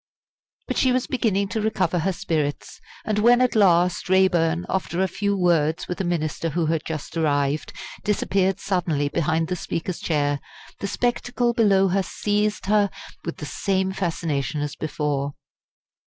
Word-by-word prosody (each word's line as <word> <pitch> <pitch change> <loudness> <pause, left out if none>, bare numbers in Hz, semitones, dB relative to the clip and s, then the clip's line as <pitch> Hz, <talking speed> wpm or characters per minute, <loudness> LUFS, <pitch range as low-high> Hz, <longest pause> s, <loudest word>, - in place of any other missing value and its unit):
But - - -2
she 260 - +4
was 255 0 +1
beginning 200 -6 0
to 220 - -2
recover 190 -5 0
her 190 +4 +1
spirits, 155 -5 -3 0.2
and 210 -1 0
when 240 +3 +5
at 255 -1 +3
last 180 -4 +3
Raeburn, 175 -3 +3
after 185 -2 -2
a - - +2
few 200 +2 -1
words 165 -4 +2
with 180 - -3
a - - -1
minister 165 -2 -1
who 165 +2 0
had 160 0 0
just 155 0 -5
arrived, 145 -2 0 0.3
disappeared 195 -2 +1
suddenly 170 -7 0
behind 160 +1 0
the 180 - -1
Speaker's 170 +1 -4
chair, 145 -3 0 0.4
the 200 - -3
spectacle 245 +2 0
below 200 -4 +4
her 195 +2 +2
seized 210 +2 -1
her 205 0 +3 0.4
with 170 - -4
the 150 - -6
same 190 +7 0
fascination 160 -6 -2
as 145 0 -3
before. 145 -2 -2
180 Hz, 155 wpm, -23 LUFS, 155-200 Hz, 0.4 s, when